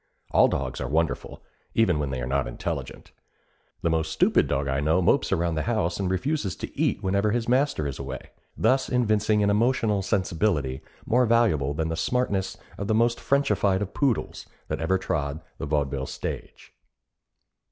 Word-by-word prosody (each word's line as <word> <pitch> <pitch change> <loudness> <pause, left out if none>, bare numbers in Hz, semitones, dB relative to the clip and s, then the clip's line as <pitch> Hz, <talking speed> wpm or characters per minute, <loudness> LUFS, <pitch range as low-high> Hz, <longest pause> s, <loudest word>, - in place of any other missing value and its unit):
All - - +6
dogs - - -3
are - - -2
wonderful, 80 0 -1 0.3
even 95 -9 +3
when 75 -2 -1
they 65 -2 -3
are - - -2
not 70 0 0
intelligent. - - -5 0.7
The 85 - +2
most 80 -1 0
stupid - - +3
dog 70 +1 -1
I 70 0 0
know 80 +5 +2
mopes 85 - +2
around 85 0 +1
the 80 - -1
house 100 -7 0
and 95 -2 0
refuses 100 - -1
to - - -7
eat - - 0
whenever 100 +2 +1
his 120 +1 -1
master 130 - +2
is 70 -3 -4
away, - - -7 0.3
thus 130 0 +2
evincing 110 -3 +2
an 100 - +3
emotional 110 -2 +2
sensibility 85 - 0 0.2
more 125 +1 +3
valuable 90 - +2
than 80 +1 -1
the 80 - -2
smartness 95 0 -1 0.2
of 100 - -3
the 110 - +2
most 120 +1 +2
Frenchified 105 -8 +2
of 100 - -7
poodles 135 -6 -1 0.2
that - - -2
ever 95 +4 +2
trod 75 -4 -2 0.2
the - - -4
vaudeville 70 -2 -1
stage. - - -7
95 Hz, 175 wpm, -26 LUFS, 75-115 Hz, 0.7 s, All